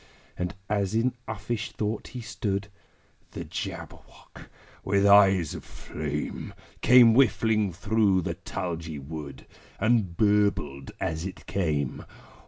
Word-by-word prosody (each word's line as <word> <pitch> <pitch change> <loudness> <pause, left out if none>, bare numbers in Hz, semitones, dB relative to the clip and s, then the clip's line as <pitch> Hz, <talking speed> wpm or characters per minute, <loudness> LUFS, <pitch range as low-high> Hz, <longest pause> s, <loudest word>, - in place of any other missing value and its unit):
And, 90 0 -3
as 100 -1 0
in 120 +3 +2
uffish 110 +1 -4
thought 105 0 -3
he 125 - -7
stood, 100 -3 -3 0.6
The - - -5
Jabberwock, - - -8 0.3
with 100 +1 +2
eyes 95 -5 +6
of - - -7
flame, 75 -1 -5 0.3
Came 125 -2 +7
whiffling 110 -5 +3
through 100 0 +2
the - - -2
tulgey 80 -3 -5
wood, 70 -1 -8 0.3
And 110 -5 +2
burbled 100 -10 +1
as 80 0 -2
it 95 - -10
came! 75 -8 -1
100 Hz, 115 wpm, -27 LUFS, 80-110 Hz, 0.6 s, Came